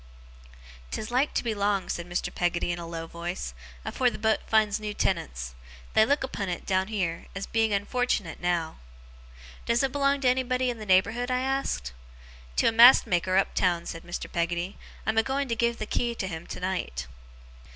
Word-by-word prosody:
''Tis 215 - -4
like 260 +4 +2
to - - +1
be 230 -2 0
long,' 200 -1 0
said 170 0 -4
Mr. 175 - -2
Peggotty, 175 0 0
in 175 - -3
a 170 - -6
low 165 -1 -5
voice, 170 - -5 0.3
'afore 255 -1 +2
the - - -7
boat 220 0 +2
finds 215 -2 +3
new 210 -1 -4
tenants. 60 +1 -1 0.4
They 220 - +5
look 285 +1 +2
upon 205 -6 -3
't, 175 -1 -4
down 190 -1 +1
heer, 185 -6 -2
as 195 - -3
being 225 -1 +1
unfortunate 205 -3 0
now!' 175 -2 -1 0.9
'Does 235 +2 +3
it 270 - +1
belong 280 0 +2
to 260 - +2
anybody 255 0 +2
in 235 - -8
the 215 - -8
neighbourhood?' 225 +7 +3
I 255 0 +1
asked. 265 - -1 0.6
'To - - +3
a - - -1
mast 235 +3 +8
maker 185 +1 +1
up 195 - +2
town,' 175 -2 +1
said 165 - -6
Mr. 175 +1 -5
Peggotty. 175 +3 -1 0.3
'I'm 220 +1 +2
a - - +6
going 270 +3 -1
to 230 - +1
give 235 +1 +1
the 215 - -3
key 235 +2 -1
to 200 - -3
him 165 -2 -6
tonight. 180 - -3
205 Hz, 195 wpm, -27 LUFS, 175-240 Hz, 0.9 s, mast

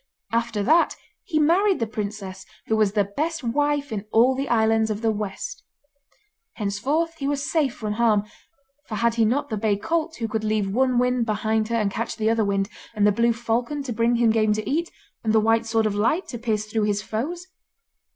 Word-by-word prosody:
After 230 -2 0
that 320 +9 +4 0.3
he 320 - -1
married 360 +6 +3
the 230 - +1
princess, 205 -3 -5 0.2
who 220 - +1
was 215 -2 +2
the 210 -2 +3
best 300 - -3
wife 290 +3 0
in 210 -1 -4
all 240 +4 +5
the 270 +2 -3
islands 220 -1 +3
of 215 +1 -3
the 225 - +3
West. 210 - -5 0.9
Henceforth 275 +12 -1
he 275 - -2
was 285 0 -1
safe 290 -7 +1
from 215 -2 -3
harm, 215 -2 +3 0.6
for 215 - -4
had 235 +2 +2
he 230 -1 +2
not 280 +6 0
the 215 - -2
bay 205 -1 +1
colt 320 +9 -1
who 230 - -3
could 220 0 -2
leave 215 -2 0
one 255 +1 +2
wind 250 -1 +1
behind 220 0 0
her 235 - -1
and 210 -3 +1
catch 230 +3 -3
the 220 0 +1
other 225 -1 +2
wind, 195 -1 0 0.3
and 205 -1 +2
the 210 - +5
blue 235 +3 +2
falcon 235 +5 -2
to 250 -3 -4
bring 230 +2 +2
him 235 -1 +3
game 215 -1 +2
to 215 0 -3
eat, 335 +4 0 0.3
and 220 -1 +1
the 220 - +5
White 225 +1 +2
Sword 225 -1 +1
of 215 - +1
Light 235 - +1
to 240 - -6
pierce 220 -3 -1
through 215 0 -1
his 205 0 0
foes? 305 +13 -4
225 Hz, 210 wpm, -24 LUFS, 215-265 Hz, 0.9 s, all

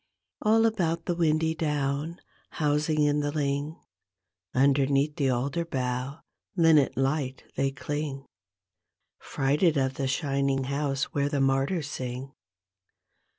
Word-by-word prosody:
All 225 +1 +4
about 175 -7 0
the 175 - 0
windy 160 -1 +1
down, 150 +1 -2 0.3
housing 150 0 +1
in 145 0 +2
the 145 0 -1
ling, 145 +1 -2 0.7
Underneath 140 +2 +2
the 140 -3 +2
alder 135 +7 0
bough 130 -1 -3 0.3
linnet 160 -5 +4
light 135 -1 -1
they 135 - +1
cling. 145 -1 -4 0.9
Fluted 150 +4 +1
of 130 -1 +1
the 135 - -1
shining 135 0 0
house 140 +1 -1
where 140 0 +1
the 145 -1 -1
martyrs 135 +4 +1
sing. 130 +1 -5
145 Hz, 115 wpm, -27 LUFS, 135-155 Hz, 0.9 s, All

